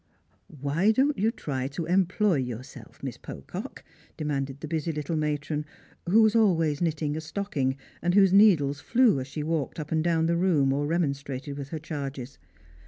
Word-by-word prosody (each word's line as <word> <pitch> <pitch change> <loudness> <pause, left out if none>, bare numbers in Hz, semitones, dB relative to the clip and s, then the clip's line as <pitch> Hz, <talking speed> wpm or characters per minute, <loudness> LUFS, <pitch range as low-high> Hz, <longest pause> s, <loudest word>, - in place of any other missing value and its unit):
" - - -39
Why 150 +8 +1
don't 275 +5 +2
you 215 +3 +3
try 135 - -3
to 150 +4 -4
employ 185 +1 +2
yourself. 125 -1 -7
Miss - - -4
Pocock," - - -8 0.3
de 155 - -4
manded 135 -2 -2
the 155 - -6
busy 160 +1 -2
little 150 +1 -3
matron, 150 0 -1 0.5
who 220 +4 +6
was 220 +1 +3
always 165 -9 +3
knitting 155 -3 -1
a 160 - -3
stocking, 155 -6 -2 0.2
and 175 +1 +1
whose 195 -2 +5
needles 165 -9 +5
flew 235 - +3
as 130 - -5
she 150 +2 -5
walked 160 -1 -2
up 150 -1 -6
and 160 -1 +1
down 165 -1 +2
the 170 +1 +1
room 155 -7 +3
or 145 +1 -1
remonstrated 140 -4 -2
with 140 -1 -7
her 160 - -4
charges. 140 -4 -6
155 Hz, 180 wpm, -27 LUFS, 140-175 Hz, 0.5 s, who